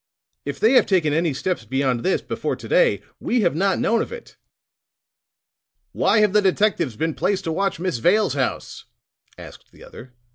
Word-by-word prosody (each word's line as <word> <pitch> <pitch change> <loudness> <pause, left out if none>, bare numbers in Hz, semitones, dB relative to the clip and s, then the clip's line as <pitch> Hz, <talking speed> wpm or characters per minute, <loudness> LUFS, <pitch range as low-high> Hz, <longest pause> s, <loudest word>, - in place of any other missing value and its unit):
"If 140 -1 -5
they 220 - +4
have 255 - +5
taken 170 -7 +1
any 165 +1 +1
steps 155 0 -3
beyond 130 +2 -1
this, 190 - 0
before - - -3
to - - -11
day, - - +2 0.2
we 245 -1 0
have 175 -6 +1
not 190 +2 +1
known 230 0 +1
of - - -5
it." 480 -1 -10 1.6
"Why 215 - +2
have 210 -2 +2
the 210 - +4
detectives 190 - +1
been 160 +7 -2
placed 200 +4 -1
to 165 - -3
watch 195 +1 -1
Miss 180 -9 -2
Vale's 190 - +2
house?" 135 -3 -4 0.5
asked - - -13
the - - -17
other. 125 +1 -13
180 Hz, 180 wpm, -22 LUFS, 140-210 Hz, 1.6 s, have